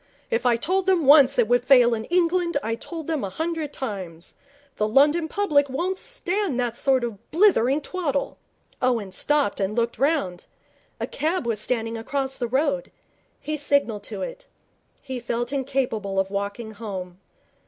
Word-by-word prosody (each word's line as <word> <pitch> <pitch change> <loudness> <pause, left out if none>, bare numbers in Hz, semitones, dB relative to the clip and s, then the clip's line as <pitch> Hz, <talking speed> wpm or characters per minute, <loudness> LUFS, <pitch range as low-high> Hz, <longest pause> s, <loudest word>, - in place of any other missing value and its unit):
If 235 +2 +1
I 240 - +4
told 370 +10 -1
them 365 -5 +3
once 285 -1 +7
it 240 -3 +4
would 245 0 +3
fail 250 -2 +6
in 220 -1 -3
England, 350 -1 +1
I 225 - -1
told 320 +7 -7
them 315 -3 -2
a 195 - -2
hundred 320 - -3
times. 185 - -6 0.4
The 215 - +1
London 295 +8 +4
public 300 -7 +2
won't 345 +8 -1
stand 395 - -2
that 240 -2 -1
sort 265 -1 +2
of 225 -5 -6
blithering 305 - +3
twaddle.' 295 -4 -3 0.4
Owen 235 -6 0
stopped 290 +4 +1
and 200 +2 -1
looked 235 0 -1
round. 275 - 0 0.5
A - - -1
cab 320 -1 -2
was 225 -3 0
standing 225 -1 -1
across 270 +3 -2
the 240 - -3
road. 270 +2 0 0.5
He 305 0 -3
signalled 280 -7 +1
to - - -5
it. - - -8 0.6
He 260 -2 -5
felt 240 +2 -3
incapable 250 -8 -1
of 190 0 -1
walking 200 +3 -4
home. 190 -4 -7
265 Hz, 165 wpm, -24 LUFS, 225-315 Hz, 0.6 s, once